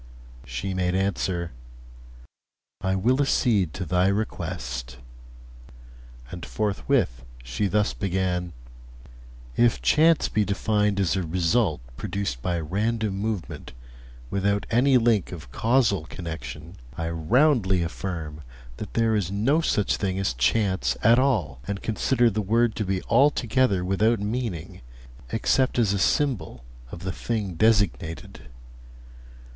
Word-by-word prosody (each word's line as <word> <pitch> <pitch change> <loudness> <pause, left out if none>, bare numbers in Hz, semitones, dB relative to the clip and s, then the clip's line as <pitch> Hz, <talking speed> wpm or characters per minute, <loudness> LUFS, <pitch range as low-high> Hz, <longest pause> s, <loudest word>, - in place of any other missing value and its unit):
She 65 +11 -4
made 90 -1 0
answer: 95 -3 -1 1.3
'I 95 0 0
will 125 +8 +2
accede 110 - +2
to 90 - -4
thy 90 +3 +2
request;' 85 - -3 1.3
and 85 -1 -7
forthwith 95 - -1 0.2
she 65 +12 -1
thus 105 +2 +1
began: 90 -2 -1 1.0
'If 120 -1 +3
chance 160 +1 +4
be 105 - +1
defined 105 0 0
as 95 -3 +1
a 95 - 0
result 85 - +1 0.2
produced 65 -3 -3
by 85 +4 -1
random 105 +6 -1
movement 100 -2 -4 0.6
without 100 +1 0
any 130 +3 +4
link 115 -4 +2
of 75 -9 -9
causal 115 -8 +2
connection, 80 -1 -7 0.2
I 80 0 -2
roundly 95 - +2
affirm 80 -3 -5 0.4
that - - -8
there 115 -1 +2
is 100 -5 0
no 115 +11 +2
such 105 - +1
thing 95 -2 -2
as 95 -9 0
chance 95 - +1
at 115 +3 +6
all, 95 - 0
and 100 -1 -4
consider 120 +2 +2
the 105 +1 -1
word 115 +3 +2
to 105 - -1
be 95 -1 -2
altogether 125 -6 +2
without 105 +4 +2
meaning, 105 -5 -4 0.5
except 130 -1 +1
as 110 -5 +3
a 100 - -1
symbol 95 - 0 0.3
of 85 - -8
the 95 - -2
thing 105 -5 -3
designated. 95 - 0
100 Hz, 125 wpm, -25 LUFS, 85-115 Hz, 1.3 s, at